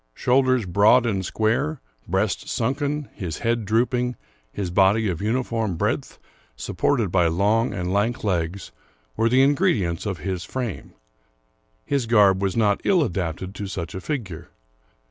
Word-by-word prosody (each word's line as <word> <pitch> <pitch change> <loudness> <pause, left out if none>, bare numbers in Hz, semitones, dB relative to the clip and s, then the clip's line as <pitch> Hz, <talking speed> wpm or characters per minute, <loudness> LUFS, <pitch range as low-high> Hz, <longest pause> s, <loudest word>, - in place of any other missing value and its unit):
Shoul 130 +2 +3
ders 130 -4 +1
broad 105 +7 +4
and 100 -5 -1
square, 115 - 0 0.3
breast 95 +3 -1
sunken, 140 +4 -1
his 90 -7 -5
head 115 -1 -1
drooping, 120 +3 +1 0.4
his 95 +2 -4
body 100 +4 +3
of 85 -1 -3
uniform 115 -3 -1
breadth, - - -2 0.4
supported 110 0 -1
by 90 -2 +3
long 105 +8 +1
and 90 +1 -3
lank 115 +5 0
legs, 90 -2 -2 0.4
were 115 - +2
the 130 +3 +4
ingredients 135 - +1
of 95 -3 -2
his 95 -2 -4
frame. 120 -1 -5 0.9
His 140 -4 -1
garb 100 -4 +4
was 95 0 -1
not 105 -3 +2
ill 180 -5 +3
adapted 90 - -3
to 100 -1 -5
such 85 -4 -5
a 95 - -6
figure. 100 - -5
105 Hz, 145 wpm, -23 LUFS, 95-125 Hz, 0.9 s, broad